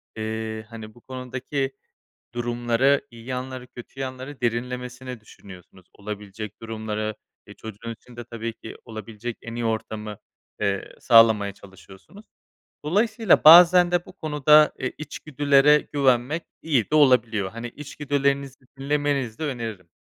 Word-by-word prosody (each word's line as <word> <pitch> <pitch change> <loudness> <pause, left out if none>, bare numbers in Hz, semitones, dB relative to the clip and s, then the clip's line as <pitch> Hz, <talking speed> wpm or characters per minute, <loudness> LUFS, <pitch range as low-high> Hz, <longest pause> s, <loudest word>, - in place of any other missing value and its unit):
eee, 110 0 -4
hani, 110 -2 -10
bu 120 - -18
konudaki 130 +2 -4 0.6
durumları, 120 +3 +1
iyi 115 -1 -13
yanları, 130 0 -5
kötü 125 +2 -12
yanları 130 +1 -6
derinlemesine 125 +1 -3
düşünüyorsunuz. 95 -3 -15
Olabilecek 105 0 -8
durumları, 110 -1 -4 0.3
eee, - - -11
çocuğun 110 +1 -8
için 120 +2 -18
de 120 - -7
tabii 115 0 -6
ki 110 - -11
olabilecek 110 +1 -7
en 115 0 -8
iyi 120 0 -3
ortamı, 110 -1 -3 0.4
eee, 100 -2 -2
sağlamaya 110 -4 +5
çalışıyorsunuz. 100 - -16 0.6
Dolayısıyla 220 +4 +2
bazen 175 +2 +9
de 175 -1 +1
bu - - -13
konuda, 150 -3 +4
eee, - - -3
içgüdülere 145 -1 +3
güvenmek 140 +3 +2 0.2
iyi 140 -9 +1
de - - +3
olabiliyor. 120 -9 +3
Hani, 115 +1 -6
içgüdülerinizi 140 -1 -2
dinlemenizi 140 -4 -1
de - - -3
öneririm. 115 - -5
120 Hz, 125 wpm, -24 LUFS, 110-140 Hz, 0.6 s, bazen